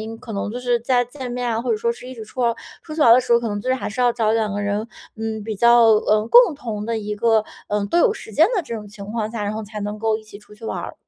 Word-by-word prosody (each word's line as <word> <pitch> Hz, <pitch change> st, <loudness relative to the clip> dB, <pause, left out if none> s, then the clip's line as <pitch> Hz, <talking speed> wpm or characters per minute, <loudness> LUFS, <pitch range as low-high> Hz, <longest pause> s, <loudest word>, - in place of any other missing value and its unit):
因， 220 Hz, +1 st, -6 dB
可 225 Hz, -, -9 dB
能 200 Hz, 0 st, -3 dB
就 240 Hz, -, -5 dB
是 245 Hz, -1 st, +1 dB
在 245 Hz, +1 st, +2 dB
见 250 Hz, 0 st, -8 dB
面 245 Hz, 0 st, -2 dB
啊， 225 Hz, -1 st, 0 dB
或 240 Hz, -, -3 dB
者 445 Hz, -, +2 dB
说 470 Hz, +2 st, 0 dB
是 470 Hz, -, -12 dB
一 260 Hz, -, -8 dB
直 225 Hz, -3 st, -8 dB
出 255 Hz, -, -8 dB
哦 235 Hz, -1 st, +1 dB, 0.3 s
出 310 Hz, -, -8 dB
去 315 Hz, -, -4 dB
玩 240 Hz, -, +6 dB
儿 -, -, +10 dB
的 250 Hz, -, +5 dB
时 250 Hz, -1 st, -1 dB
候， 235 Hz, -, +6 dB
可 235 Hz, -, -3 dB
能 205 Hz, -1 st, -3 dB
就 255 Hz, -, -5 dB
是 260 Hz, -, +3 dB
还 260 Hz, -, -4 dB
是 220 Hz, +4 st, -5 dB
要 245 Hz, -1 st, +4 dB
找 225 Hz, -2 st, +1 dB
两 220 Hz, -2 st, 0 dB
个 205 Hz, -, -2 dB
人， 205 Hz, +2 st, -1 dB, 0.3 s
嗯， 220 Hz, -1 st, -4 dB
比 220 Hz, +1 st, -4 dB
较 235 Hz, +2 st, +6 dB
呃， 215 Hz, 0 st, +2 dB
共 480 Hz, -, +7 dB
同 225 Hz, -7 st, -5 dB
的 230 Hz, +1 st, -2 dB
一 210 Hz, -1 st, -4 dB
个 220 Hz, 0 st, +2 dB, 0.2 s
呃， 205 Hz, 0 st, 0 dB
都 340 Hz, -, +1 dB
有 430 Hz, +4 st, +4 dB
时 225 Hz, -, -10 dB
间 315 Hz, +10 st, +5 dB
的 370 Hz, -, +1 dB
这 235 Hz, -6 st, -6 dB
种 210 Hz, -2 st, -7 dB
情 200 Hz, -1 st, -10 dB
况 215 Hz, 0 st, -3 dB
下， 230 Hz, -2 st, -4 dB
然 205 Hz, -, -2 dB
后 220 Hz, +1 st, -4 dB
才 210 Hz, 0 st, -7 dB
能 205 Hz, +1 st, -4 dB
够 220 Hz, 0 st, +1 dB
一 220 Hz, -, -11 dB
起 210 Hz, -1 st, -12 dB
出 210 Hz, 0 st, -17 dB
去 210 Hz, -, -14 dB
玩 -, -, -3 dB
儿。 -, -, -6 dB
225 Hz, 360 characters per minute, -21 LUFS, 210-245 Hz, 0.3 s, 儿